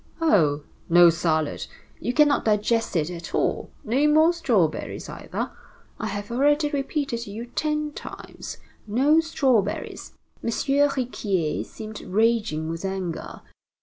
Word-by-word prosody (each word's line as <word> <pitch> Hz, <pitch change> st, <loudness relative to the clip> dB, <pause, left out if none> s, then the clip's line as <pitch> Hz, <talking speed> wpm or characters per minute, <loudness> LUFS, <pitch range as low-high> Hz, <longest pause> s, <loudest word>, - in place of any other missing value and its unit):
Oh! 155 Hz, -, +3 dB, 0.3 s
no 175 Hz, 0 st, +8 dB
salad! 160 Hz, -2 st, -1 dB, 0.3 s
You -, -, -1 dB
cannot 295 Hz, +1 st, +4 dB
digest 220 Hz, +1 st, +1 dB
it 160 Hz, 0 st, +1 dB
at 170 Hz, -1 st, -6 dB
all. -, -, 0 dB
No 265 Hz, +7 st, +2 dB
more 315 Hz, +3 st, +5 dB
strawberries 220 Hz, -, 0 dB
either! -, -, -5 dB, 0.5 s
I -, -, -2 dB
have 205 Hz, +1 st, -5 dB
already 290 Hz, +4 st, +2 dB
repeated 275 Hz, -3 st, -1 dB
to 235 Hz, -4 st, -7 dB
you 225 Hz, +4 st, -6 dB
ten 300 Hz, +4 st, -1 dB
times, -, -, -8 dB, 0.3 s
no 275 Hz, +9 st, +4 dB
strawberries!" 260 Hz, -, 0 dB, 0.3 s
M. -, -, -1 dB
Riquier 250 Hz, -, 0 dB
seemed 215 Hz, -1 st, -9 dB
raging 210 Hz, -6 st, +1 dB
with 165 Hz, +2 st, -4 dB
anger. 190 Hz, -3 st, -4 dB
230 Hz, 125 wpm, -25 LUFS, 180-285 Hz, 0.5 s, no